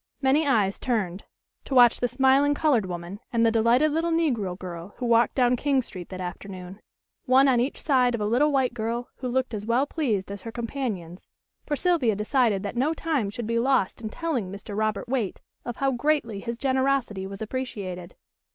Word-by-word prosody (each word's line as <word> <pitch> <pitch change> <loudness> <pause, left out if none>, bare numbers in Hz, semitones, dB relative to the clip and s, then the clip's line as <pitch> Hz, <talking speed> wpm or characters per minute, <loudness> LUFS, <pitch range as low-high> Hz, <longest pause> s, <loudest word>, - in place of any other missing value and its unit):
Many 285 +3 +2
eyes 205 -7 +2
turned 205 -7 -2 0.4
to 270 - -3
watch 245 -2 +6
the 245 - +1
smiling 270 +3 +3
colored 265 -11 +2
woman 175 +2 -6
and 230 -1 +2
the 225 - +4
delighted 235 +7 +3
little 325 +3 0
negro 245 - 0
girl 180 0 -8
who 250 - -3
walked 235 0 +3
down 250 -1 +3
King 270 0 +1
Street 180 -6 -9
that 185 - -7
afternoon, 185 +1 -7 0.4
one 265 +1 +5
on 255 -3 +4
each 255 +4 -1
side 250 -4 +2
of 225 - -4
a - - 0
little 250 +8 +3
white 265 -3 +1
girl 235 +1 -3
who 255 - -4
looked 255 0 -1
as 210 0 -5
well 240 +4 +2
pleased 225 - -2
as 200 -1 -7
her 230 - -7
companions, 225 -8 -5 0.4
for 295 - 0
Sylvia 290 - +2
decided 210 -1 +1
that 200 +2 -4
no 285 +7 +1
time 300 -11 -1
should 225 +3 -5
be 230 +1 0
lost 250 -5 +1
in 220 - -4
telling 250 - -3
Mr. 200 +1 -7
Robert 215 -1 -1
Waite 235 -6 -2 0.3
of 240 - -4
how 275 0 +1
greatly 250 -5 0
his 235 +3 -5
generosity 260 -7 0
was 195 0 -8
appreciated. 200 -7 -5
235 Hz, 195 wpm, -26 LUFS, 205-270 Hz, 0.4 s, watch